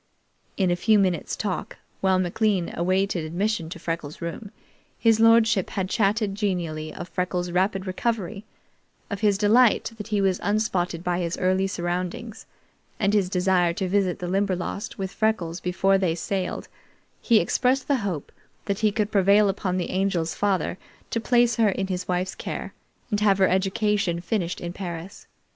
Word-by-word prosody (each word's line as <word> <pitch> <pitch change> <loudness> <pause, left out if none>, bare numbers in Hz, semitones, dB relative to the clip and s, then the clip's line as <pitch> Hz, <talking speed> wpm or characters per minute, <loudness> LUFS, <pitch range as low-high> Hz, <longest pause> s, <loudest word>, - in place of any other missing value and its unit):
In 185 -3 +2
a - - +3
few 215 +4 +3
minutes' 185 -4 0
talk, 200 -4 -4 0.2
while 190 -1 +3
McLean 185 0 0
awaited 185 0 0
admission 170 +1 -1
to 170 - -7
Freckles' 165 -3 -5
room, 170 +5 -6 0.5
his 225 -1 +3
lordship 225 -4 +4
had 190 -1 -2
chatted 210 0 +1
genially 175 -7 -2
of 175 - -7
Freckles' 180 -1 -2
rapid 190 +2 0
recovery, 205 +1 -2 0.7
of 200 - -4
his 205 -2 +3
delight 225 +3 +4
that 210 - -7
he 210 -2 0
was 190 -2 +1
unspotted 185 -5 0
by 180 0 0
his 170 -1 -2
early 185 +1 +1
surroundings, 180 +5 -4 0.5
and 200 -1 +2
his 200 -4 +2
desire 180 -2 +2
to 185 +2 -2
visit 190 -1 +1
the 180 - -5
Limberlost 195 +1 -2
with 190 -1 -4
Freckles 185 -6 -1
before 195 +2 +2
they 175 -4 +1
sailed; 185 +2 -3 0.5
he 230 -3 +4
expressed 255 +8 +1
the 280 - +2
hope 190 - -4 0.3
that 200 -1 -1
he 215 -1 +3
could 210 0 -1
prevail 200 +1 +4
upon 190 -1 -1
the 180 - -2
Angel's 185 -4 0
father 190 -3 0 0.3
to 230 - -1
place 240 -1 +3
her 225 -2 +4
in 195 0 -1
his 185 -1 -4
wife's 180 +1 -1
care - - -6 0.4
and 210 - +1
have 205 -2 +3
her 190 -1 +4
education 195 -1 +1
finished 175 0 -2
in 175 0 -5
Paris. 175 -1 -7
190 Hz, 165 wpm, -25 LUFS, 180-210 Hz, 0.7 s, lordship